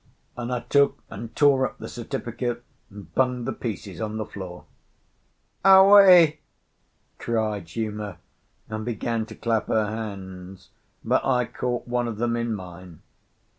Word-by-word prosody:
And 120 0 -5
I 125 -1 -1
took 140 0 +2
and 115 +2 -8
tore 140 -3 +4
up - - -3
the - - -8
certificate 120 0 -4 0.3
and 100 -6 -13
bunged 125 -2 +1
the - - -1
pieces 100 -5 -6
on 110 0 -3
the 110 - -3
floor. 90 -3 -9 1.0
"Aué!" 190 -4 +8 0.8
cried 105 -7 -2
Uma, 105 -4 -4 0.5
and 110 0 -5
began 115 -1 -2
to - - -10
clap 115 -2 -1
her 110 -1 +2
hands; 95 -4 -7 0.4
but - - +2
I 125 -2 +2
caught 120 +1 -3
one 120 0 -1
of 115 -3 -5
them 120 +1 0
in 115 -1 -1
mine. 90 -3 -11
115 Hz, 140 wpm, -24 LUFS, 105-125 Hz, 1.0 s, Aué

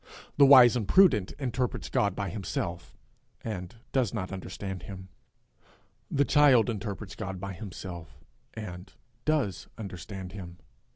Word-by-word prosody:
The 140 -1 +8
wise 125 -3 +9
and 110 -5 -1
prudent 170 - +5
interprets 125 -2 -2
God 100 -2 +1
by 100 -1 -3
himself, 85 -3 -4 0.5
and 95 -3 -5 0.2
does 125 -7 +1
not 95 - -3
understand 95 0 -6
him; 95 -1 -9 1.0
the 140 - +2
child 135 -6 +5
interprets 100 -2 -5
God 95 -4 -5
by 100 +1 -5
himself, 85 -5 -8 0.4
and 95 -3 -7 0.3
does 145 - 0
understand 95 -2 -7
him. 90 -3 -9
100 Hz, 125 wpm, -29 LUFS, 95-120 Hz, 1.0 s, wise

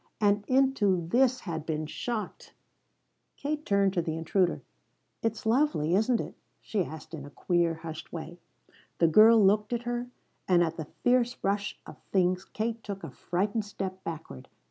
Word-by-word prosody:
And 205 -1 +3
into 235 -10 +2
this 255 +3 +3
had 165 -4 -4
been 155 -1 -2
shot! 220 +8 -5 0.8
Katie 295 +1 -2
turned 200 -7 +2
to 175 - +1
the 160 -1 -3
intruder. 175 +2 +1 0.6
"It's 225 -1 -2
lovely, 225 - +2
isn't 220 +5 +3
it?" - - -5 0.3
she 205 -4 -1
asked 160 0 -9
in 150 -3 -6
a 145 - -9
queer, 170 +2 +1
hushed 160 -1 -8
way. 170 +1 -7 0.6
The 165 - +4
girl 220 +7 +7
looked 210 +3 +3
at 240 0 -2
her, 240 0 -2 0.4
and 175 -2 +5
at 165 -1 -1
the 155 -3 -5 0.2
fierce 245 0 +3
rush 200 +1 -1
of - - -11
things 180 -1 +2
Kate 225 +1 -3
took 200 -1 -6
a - - -6
frightened 200 +5 -1
step 190 -2 -6
backward. 160 - -7
195 Hz, 165 wpm, -29 LUFS, 170-230 Hz, 0.8 s, girl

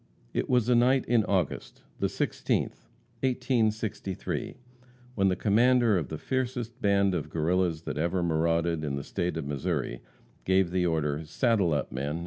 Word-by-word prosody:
It - - -1
was 125 -3 +3
a 125 - +4
night 125 +2 +4
in 120 -2 +3
August 90 -7 -2 0.2
the - - +2
16th - - -2 0.3
1863, 115 -6 -1 0.6
when 100 -4 +2
the 95 - +2
commander 115 +3 +3
of 85 -6 -1
the 80 - -5
fiercest 125 - -3
band 100 -1 +3
of 80 -3 -3
Guerrillas 85 +1 0
that 75 - -4
ever 85 +3 0
marauded 85 0 +1
in 70 -2 -2
the 70 - -4
State 85 -1 -2
of 80 - -3
Missouri, 70 -3 -2 0.4
gave 95 -1 +2
the 90 -1 +1
order, 75 -2 -1
"Saddle 100 - +1
up, 75 - -1
men!" 70 +5 -3
90 Hz, 155 wpm, -28 LUFS, 80-115 Hz, 0.6 s, a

